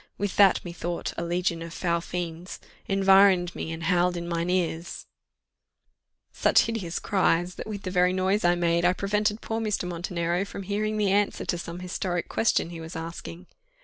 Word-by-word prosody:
With 205 -1 -2
that, 195 -3 +5
methought, 170 0 -4
a 170 - -3
legion 170 -1 -1
of 165 +1 -7
foul 170 -2 0
fiends 175 0 -5 0.3
Environ'd 195 -2 +5
me, 160 - -5
and 165 +1 -6
howled 180 0 +2
in 170 0 -5
mine 170 0 -1
ears" 170 -2 -2 1.3
Such - - +4
hideous 200 -7 -3
cries! 180 -2 +1
that - - -8
with 205 -2 -6
the 185 - -4
very 180 0 +3
noise 190 +3 +1
I 175 0 +4
made, 170 0 +1
I 180 +1 +4
prevented 210 +3 0
poor 225 0 -3
Mr. 210 -4 -1
Montenero 175 0 -1
from 200 0 -7
hearing 215 +2 -1
the 205 -2 +2
answer 205 +1 +1
to - - 0
some 170 +1 -7
historic 180 -1 -3
question 215 -6 +1
he 165 -1 -7
was 160 +2 -8
asking. 165 +2 -7
180 Hz, 180 wpm, -26 LUFS, 170-195 Hz, 1.3 s, that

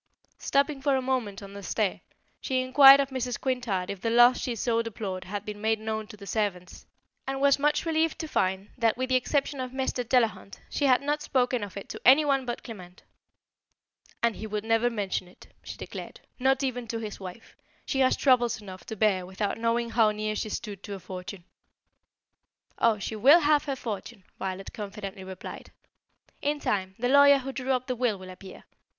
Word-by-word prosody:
Stopping 280 0 +1
for 275 0 +2
a - - +2
moment 240 -7 -2
on 200 0 -10
the 200 - -8
stair, 200 +1 -1 0.4
she 255 -2 -1
inquired 270 +1 +8
of 275 -1 +1
Mrs. 250 -2 -3
Quintard 240 -9 -1
if 200 -2 -8
the 230 - 0
loss 240 +2 +6
she 245 - -3
so 230 +1 0
deplored 200 -5 -5
had 205 +2 -5
been 210 -1 -7
made 220 0 +1
known 220 0 -4
to 210 -2 -12
the 200 - -11
servants, 195 -3 -3 0.4
and 270 0 -2
was 280 0 +4
much 295 +3 +1
relieved 320 0 +1
to 320 - -5
find 190 -6 -1
that, 230 -1 +2
with 255 +1 -2
the 260 - +3
exception 275 +2 0
of 255 -1 -3
Mr. 260 -1 -2
Delahunt, 230 -4 0
she 290 - 0
had 260 0 +4
not 295 +1 -1
spoken 250 -5 0
of 200 -1 -7
it 200 - -7
to - - -7
any 275 +5 +7
one 275 -2 +1
but 240 - -4
Clement. 185 -6 -11 1.2
"And 235 -2 +2
he 220 - -6
will 210 -1 -3
never 225 +2 +2
mention 200 -5 -3
it," 180 - -18
she - - -9
declared, - - -8 0.2
"not 265 +2 +2
even 250 -3 -2
to 230 - -3
his 215 -2 -6
wife. 190 +3 -10 0.3
She 270 - -2
has 260 -1 +3
troubles 245 -4 +3
enough 185 -4 -10
to 220 - -5
bear 200 -3 +2
without 200 +3 -3
knowing 230 0 0
how 225 -2 +4
near 215 0 -2
she 215 - -3
stood 205 -2 -5
to 200 - -6
a - - -8
fortune." 185 0 -8 1.4
"Oh, 230 -2 +3
she 210 +2 -5
will 280 +11 +6
have 295 0 +3
her 275 -2 -2
fortune!" 220 -3 -6 0.2
Violet 190 0 -5
confidently 200 -2 -7
replied. 185 -1 -9 0.7
"In 295 +1 0
time, 190 -6 -2
the 245 - -1
lawyer 280 +1 +7
who 270 0 -5
drew 265 0 -3
up 255 0 -1
the 255 -1 -2
will 235 -4 0
will 185 0 -10
appear. 185 +1 -12
230 Hz, 200 wpm, -27 LUFS, 200-260 Hz, 1.4 s, inquired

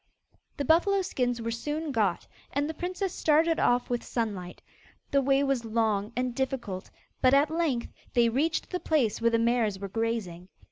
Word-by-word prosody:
The 285 - -2
buffalo 380 +6 +3
skins 245 -9 -1
were 230 - -2
soon 295 +6 -3
got, 210 -8 0 0.3
and 285 +1 0
the 320 - -4
princess 365 +3 -3
started 320 +2 +3
off 245 0 +2
with 245 -1 -2
Sunlight. 200 -7 -4 0.5
The 275 - +4
way 275 +1 +3
was 270 -4 0
long 220 -2 0
and 250 0 -1
difficult, 245 -8 -3 0.3
but 260 +1 +5
at 290 +2 +3
length 315 -8 -1 0.2
they 240 -1 +5
reached 285 +8 0
the 360 - -1
place 260 -12 +1
where 230 - +4
the 230 - +2
mares 230 -3 +1
were 200 0 -6
grazing. 205 -5 -3
245 Hz, 175 wpm, -28 LUFS, 225-295 Hz, 0.5 s, but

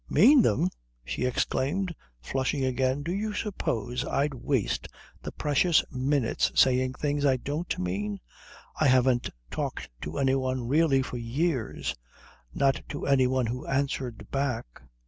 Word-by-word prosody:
"Mean 255 - +7
them?" 105 - +2 0.3
she 60 - -2
exclaimed, 150 +8 0 0.3
flushing 130 - -1
again. 130 +2 0
"Do 170 - -2
you 210 +2 -2
suppose 125 - -2
I'd 145 +1 0
waste 130 -3 -1 0.3
the - - -6
precious 150 +3 +2
minutes 130 -1 +1
saying 130 0 +4
things 145 +1 -1
I 135 -2 +4
don't 150 +7 -3
mean? 100 +3 -2 0.6
I 155 - +4
haven't 130 -1 +3 0.2
talked - - -4
to 75 +2 -5
any 135 -1 +2
one 130 -2 -1
really 140 -1 +3
for 125 - -5
years 125 +2 -1 0.6
not 135 - +1
to - - -4
any 130 -2 +4
one 130 -1 +1
who 125 +3 -4
answered 135 -6 -2
back. 130 - -2
130 Hz, 140 wpm, -28 LUFS, 125-145 Hz, 0.6 s, Mean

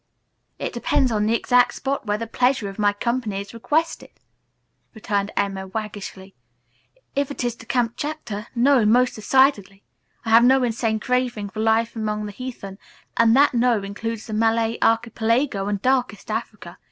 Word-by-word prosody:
"It - - -4
depends 260 -3 +1
on 210 -1 +1
the 225 - +2
exact 245 +1 +3
spot 275 -4 -3
where 205 0 0
the 230 - -4
pleasure 245 -1 +1
of 195 +1 -9
my 205 -1 +3
company 225 -1 -2
is 200 +2 -8
requested," 310 +8 -1 0.9
returned 205 -2 -2
Emma 195 -1 -1
waggishly. 200 -2 -7 0.8
"If 280 -1 0
it 285 - -5
is 240 -1 -1
to 230 - -14
Kamptchatka 240 -2 -3
no, 255 0 +4
most 245 +4 +3
decidedly. 215 -4 +2 0.4
I 225 - -2
have 230 +1 +7
no 260 +1 +5
insane 225 -2 0
craving 245 -4 -1
for 215 - -8
life 225 +1 +1
among 215 -1 -2
the 205 - -6
heathen, 205 -4 -8 0.4
and 230 0 +4
that 285 +1 +5
'no' 235 -3 +2
includes 220 +3 -5
the 220 - -7
Malay 225 +1 +1
Archipelago 230 -1 +1
and 205 -1 -1
darkest 250 -6 0
Africa. 210 -5 -6
225 Hz, 160 wpm, -22 LUFS, 210-250 Hz, 0.9 s, have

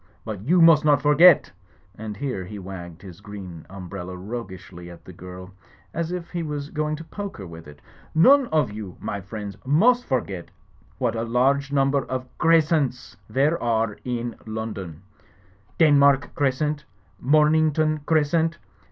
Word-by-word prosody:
But 110 -4 -5
you 165 - +4
must 165 -2 +7
not 145 -3 +4
forget," 150 +3 +6 0.4
and 105 0 -7
here 130 -9 -3
he 105 +3 -8
wagged 90 -2 -9
his 90 -1 -12
green 95 -6 -9
umbrella 95 -1 -7
roguishly 95 -4 -8
at 85 - -13
the 90 - -11
girl, 90 +2 -10 0.4
as 165 +1 -2
if 180 -1 -5
he 175 - -3
was 150 -2 -5
going 155 0 -1
to 160 - -9
poke 200 +4 -7
her 95 - -8
with 80 -2 -11
it, 75 0 -14 0.3
"none 265 - +6
of 150 - +1
you, 105 -4 -8
my 100 - -4
friends, 100 +1 -7
must 230 - +3
forget 100 -9 -3 0.5
what 120 -3 -1
a 115 - -2
large 135 +4 +1
number 140 0 +2
of 130 -1 -5
Crescents 155 -5 +2
there 145 +5 +1
are 115 -2 0
in 120 -1 -3
London 105 -7 -6
I 100 +1 -32 0.6
Denmark 140 -3 +4
Crescent; 145 +2 -1 0.4
Momington 155 +1 +3
Cres 150 -2 +2
cent! 165 -1 +1
130 Hz, 155 wpm, -24 LUFS, 100-155 Hz, 0.6 s, must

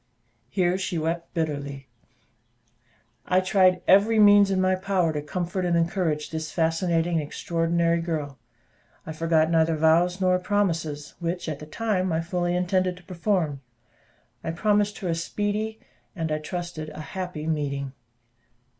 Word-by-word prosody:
Here 180 +6 +1
she 185 -2 -2
wept 165 +2 -2
bitterly. 140 -4 -3 1.4
I 185 - +4
tried 185 -1 +3
every 205 +4 +5
means 205 -1 +7
in 190 -1 +1
my 185 0 +3
power 185 -3 0
to 150 - -2
comfort 180 +5 -3
and 175 -1 +2
encourage 165 -3 0
this 160 -1 -4
fascinating 165 0 +1
and - - +1
extraordinary 170 +2 0
girl; 150 -5 -4 0.7
I - - -5
forgot 160 0 +2
neither 160 0 +3
vows 165 +4 +3
nor 185 -1 +3
promises, 165 -7 -1
which, 170 +1 -3
at 150 -2 -4
the 150 - -9
time, 190 0 -1
I 160 - +1
fully 175 +1 -1
intended 180 0 0
to 180 - -15
perform. 170 -6 -1 0.8
I - - -3
promised 205 +4 +1
her 190 - -5
a 170 - +1
speedy 205 +6 -2 0.4
and 165 -3 -3
I 155 - 0
trusted 170 -1 -5
a 155 - -8
happy 180 -5 -4
meeting. 140 -4 -2
170 Hz, 145 wpm, -25 LUFS, 160-185 Hz, 1.4 s, means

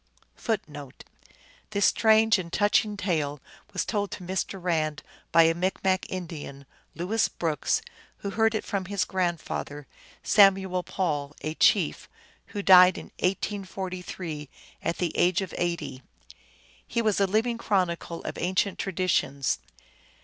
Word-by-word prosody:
1 225 -2 +2
1 145 -4 -9 0.8
This 200 0 +1
strange 220 -1 +4
and 170 -2 -6
touching 205 +1 +2
tale 155 -7 -1 0.3
was 190 - -2
told 205 -2 -1
to - - -7
Mr. 190 +1 -3
Rand 155 -4 -1 0.3
by 165 0 +7
a 165 0 +4
Micmac 185 +2 0
Indian, 155 -6 -7 0.3
Louis 200 +6 +1
Brooks, 165 - -1 0.3
who 200 - -5
heard 225 +1 +2
it 220 - -2
from 195 -2 -2
his 200 +1 -1
grandfather, 170 -5 -3 0.4
Samuel 190 -3 +4
Paul, 150 -6 -2
a 155 - -3
chief, - - +2 0.4
who 205 -2 -5
died 185 -1 +8
in - - -9
1843, 185 -5 -3 0.3
at 165 +1 -2
the 175 -2 -2
age 180 +2 +3
of 190 - -8
eighty. 170 -6 -3 0.9
He 235 - -1
was 215 -3 +2
a 195 - +3
living 230 +4 0
chronicle 175 -5 -1
of - - -5
ancient 185 +2 0
traditions. 170 -7 0
185 Hz, 135 wpm, -27 LUFS, 165-200 Hz, 0.9 s, died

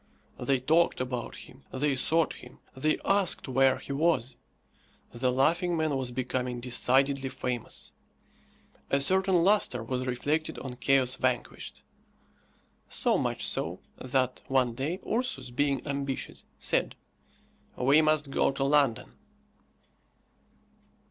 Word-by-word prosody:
They 135 -2 +1
talked 160 +6 +2
about 125 -2 -3
him, 130 +2 -13
they 140 +1 0
sought 160 +5 +1
him, 125 - -13 0.2
they 155 +4 +1
asked 195 -2 +2
where 130 0 +3
he - - -8
was. 140 -5 +1 0.8
The 125 +1 0
laughing 170 +7 +2
man 155 -2 0
was 130 -2 -2
becoming 125 0 -2
decidedly 135 +2 +1
famous. 125 -2 -4 1.0
A 140 - +2
certain 185 +3 +2
lustre 190 - +2
was 130 +2 -3
reflected 145 +5 -1
on 125 -2 -7
"Chaos 130 0 +3
Vanquished." 130 -2 -3 1.1
So - - +2
much - - -1
so, - - -2 0.2
that, 130 0 -1
one 130 -3 +2
day, 145 +9 -3
Ursus, 215 - -2
being 140 +2 0
ambitious, 140 -2 -4
said, - - 0 0.8
"We 140 +5 +5
must 155 -2 +1
go - - +2
to 135 - -1
London." 140 -4 +2
135 Hz, 120 wpm, -29 LUFS, 125-155 Hz, 1.1 s, We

